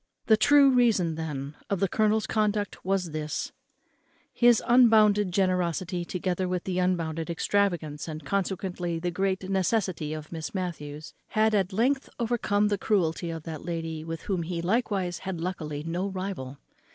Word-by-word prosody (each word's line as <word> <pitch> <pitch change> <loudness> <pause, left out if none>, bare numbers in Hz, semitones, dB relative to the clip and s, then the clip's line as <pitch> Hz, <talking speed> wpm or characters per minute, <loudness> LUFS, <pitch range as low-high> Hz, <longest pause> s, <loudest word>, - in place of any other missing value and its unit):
The 220 - +6
true 280 +4 +6
reason, 225 -10 +3
then, 150 -3 -5 0.2
of 200 - 0
the 195 - +2
colonel's 215 +2 +2
conduct 210 -1 -1
was 185 -3 0
this: 155 -1 -3 0.8
his 240 -2 +4
unbounded 215 -5 +5
generosity, 180 -1 0
together 180 +1 -2
with 180 -1 -2
the 185 -1 -2
unbounded 165 -3 -1
extravagance 170 -4 0
and 155 -2 -7
consequently 180 -1 -2
the 175 +2 -2
great 190 +1 -1
necessity 190 -4 0
of 155 -1 -8
Miss 160 +3 -6
Matthews, 155 -5 -5
had 220 0 +2
at 195 -2 +1
length 255 +7 +1
overcome 215 -3 +1
the 205 -2 0
cruelty 175 -5 0
of 165 -1 -5
that 160 -2 -7
lady, 165 -2 -4
with 165 0 -6
whom 190 -4 -1
he 170 +1 -3
likewise 190 -2 0
had 190 -3 -5
luckily 155 -4 -4
no 175 +4 -2
rival. 185 -9 -5
185 Hz, 150 wpm, -27 LUFS, 165-205 Hz, 0.8 s, The